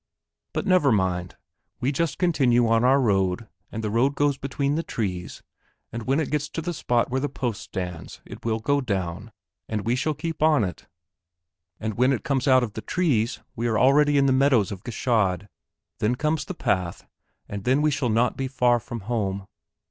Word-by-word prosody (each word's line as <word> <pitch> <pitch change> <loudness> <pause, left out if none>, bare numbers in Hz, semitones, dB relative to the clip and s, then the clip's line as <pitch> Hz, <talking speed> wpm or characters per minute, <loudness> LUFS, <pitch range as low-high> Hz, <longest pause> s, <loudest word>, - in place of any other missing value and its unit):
But - - -2
never 185 -8 +4
mind. 90 -3 0 0.4
We 130 - 0
just 155 +2 -1
continue 130 -9 +3
on 115 +1 +3
our 135 +2 +5
road, 95 -3 +1 0.2
and 110 - -5
the 105 - -1
road 130 +6 +2
goes 145 -1 +2
between 140 +1 -2
the 160 - 0
trees 95 - -4 0.5
and 115 0 -6
when 135 +3 +2
it 155 - -2
gets 150 -1 -1
to 165 - -4
the 175 +1 -2
spot 120 -5 0
where 130 +1 0
the 145 - -1
post 125 -5 -3
stands 90 -3 -6
it - - -11
will 110 -1 0
go 140 +6 +1
down, 100 -2 -3 0.4
and 105 -2 -2
we 120 +2 +2
shall 150 +4 -1
keep 165 +1 -5
on 155 -6 +4
it, 90 -5 -5 0.9
and 110 0 -4
when 130 +2 +4
it 125 - -3
comes 135 -1 0
out 130 -1 +5
of 110 -4 -4
the 110 - -5
trees 130 -10 0
we 120 +1 -1
are 110 -2 +1
already 145 +3 +4
on 140 - +4
the 135 - +4
meadows 130 -6 +3
of 100 -1 -7
Gschaid, 105 -5 0 0.5
then 110 +4 +1
comes 150 +4 -1
the 185 - -6
path, 90 - -1 0.4
and 100 -1 -6
then 130 +6 +2
we 155 - +3
shall 130 -3 0
not 115 +3 +2
be 135 - -2
far 125 -2 +2
from 115 0 -7
home." 100 -3 -2
120 Hz, 200 wpm, -25 LUFS, 105-140 Hz, 0.9 s, our